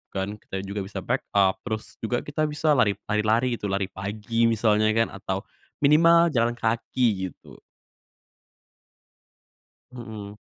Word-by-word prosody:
kan, 100 +2 -3
kita 95 -1 -6
juga 100 +1 -5
bisa 95 -2 -6
back 125 +6 -2
up 95 -2 +3
terus 110 -2 -5
juga 120 +2 -2
kita 155 +1 -1
bisa 150 +1 0
lari 120 -8 +3 0.2
lari-lari 110 +3 +1
gitu, 105 - -3
lari 95 -1 -2
pagi 110 +4 -1
misalnya 110 -1 +2
kan 115 0 +2
atau 95 0 -4 0.4
minimal 165 +4 +6
jalan 120 -3 +1
kaki 110 -3 0
gitu. 90 - -15 2.3
Mhm. 110 -4 -8
110 Hz, 130 wpm, -25 LUFS, 100-120 Hz, 2.3 s, minimal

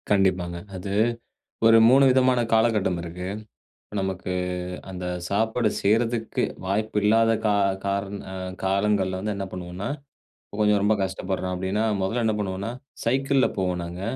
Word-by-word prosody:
கண்டிப்பாங்க. 95 -3 +2 0.2
அது 95 +2 -4 0.7
ஒரு 115 0 +8
3 135 +2 +6
விதமான 130 -1 +3
காலகட்டம் 110 -6 +2
இருக்கு. 90 +2 -6 0.7
நமக்கு 95 -1 -3 0.6
அந்த 90 -1 -6 0.2
சாப்பாடு 110 +2 +1
செய்றதுக்கு 115 +2 +1 0.2
வாய்ப்பு 105 +3 -1
இல்லாத 115 +2 +4
கா 105 - +3
கா - - +2 0.3
காரண 100 0 -2 0.2
அ - - -6 0.3
காலங்கள்ல 95 -1 +1
வந்து 105 +2 -2
என்ன 100 0 -3
பண்ணுவோனா, 90 +2 -5 0.6
இப்ப 105 - -11
கொஞ்சம் 105 -1 +3
ரொம்ப 105 +1 +3
கஷ்டப்படுறோம். 95 0 -3
அப்டீன்னா, 95 +4 -1 0.2
மொதல்ல 115 +6 0
என்ன 110 - +2
பண்ணுவோம்னா, 100 +2 -3 0.3
சைக்கிள்ல 135 +3 +2
போவோம். 90 -2 -1
நாங்க, 85 +2 -7
100 Hz, 135 wpm, -25 LUFS, 95-110 Hz, 0.7 s, ஒரு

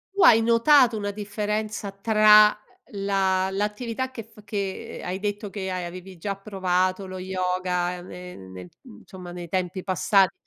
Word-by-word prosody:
Tu 400 - +1
hai 225 0 +7
notato 235 +1 +5
una 205 -1 -3
differenza 210 0 -3
tra, 215 +1 +6
uhm, 205 -1 -9
la 190 -1 +1
l'attività 225 +5 -3
che 230 -4 -7
f 220 -1 -18
che 200 -2 -5
hai 185 +2 -4
detto 205 0 -3
che 190 -1 -5
hai 185 -1 -3
avevi 185 +2 -8
già 195 +3 -4
provato, 185 -1 -1
lo 185 0 -7
yoga 180 -1 -2
ne 180 0 -10
nel, 95 -2 -11
mhmm, 245 -4 -14
insomma 180 -3 -11
nei 175 -2 -8
tempi 185 0 -2
passati? 190 0 +3
195 Hz, 160 wpm, -25 LUFS, 185-210 Hz, -, hai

